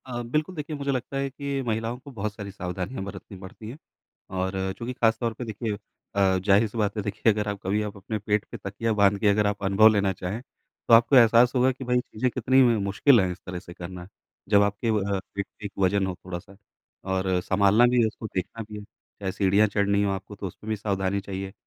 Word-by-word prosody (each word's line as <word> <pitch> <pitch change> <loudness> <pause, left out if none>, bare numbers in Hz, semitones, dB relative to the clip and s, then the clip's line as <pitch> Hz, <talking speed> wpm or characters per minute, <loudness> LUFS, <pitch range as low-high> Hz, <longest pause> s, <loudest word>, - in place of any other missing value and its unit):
अ, 120 -2 -4
बिल्कुल 150 +9 -2
देखिए 150 0 -5
मुझे 140 -1 -2
लगता 130 +1 -3
है 135 0 -1
कि 140 0 -3
महिलाओं 115 +1 -2
को 140 +2 -12
बहुत 105 -3 -4
सारी 100 -1 -7
सावधानियाँ 95 +3 -5
बरतनी 100 0 -9
पड़ती 100 +3 -10
हैं। 130 - -8 0.6
और 95 +1 -1
चूँकि 120 +3 -4
ख़ास 115 -2 +2
तौर 115 -2 -1
पे 125 - -6
देखिए, 110 0 -3 0.4
अ, 95 -1 +3
ज़ाहिर-सी 105 +2 +3
बात 105 0 0
है 105 - -1
देखिए 105 +2 +1
अगर 105 0 -2
आप 100 -1 -4
कभी 100 +3 0
आप 105 -1 -6
अपने 105 +3 -4
पेट 105 0 0
पे 115 - -6
तकिया 110 +3 -2
बाँध 100 -1 +3
के 105 - +2
अगर 105 +1 +3
आप 105 0 -3
अनुभव 100 +3 +6
लेना 100 -2 +1
चाहें 95 +5 -5 0.5
तो - - +5
आपको 115 +4 +6
एहसास 120 0 +6
होगा 130 +1 +4
कि 130 +1 -8
भई 125 0 +2
चीज़ें 125 0 -2
कितनी 130 +3 +3
म 115 -4 +3
मुश्किल 115 +6 +4
है 95 -1 0
इस 90 - -7
तरह 90 -1 -5
से 85 - -12
करना। 90 0 -8 0.4
जब 100 -1 +6
आपके 100 +3 -1
वह 100 -2 0 0.2
पेट 100 0 -2 0.2
एक 100 - -4
वजन 95 +1 +2
हो 90 - -3
थोड़ा-सा 90 +1 -7 0.6
और 95 -1 +1
सँभालना 100 +4 +4
भी 125 0 +3
है 110 - +4
उसको 110 - -8
देखना 100 +5 -3
भी 105 - -7
है - - -9
चाहे 100 -1 -8
सीढ़ियाँ 100 +2 +3
चढ़नी 100 0 +1
हो 100 - +1
आपको 95 +2 -6
तो 100 -1 -5
उसमें 105 +4 -10
भी 110 - +1
सावधानी 100 -1 -1
चाहिए। 95 0 -6
105 Hz, 225 wpm, -26 LUFS, 95-115 Hz, 0.6 s, अनुभव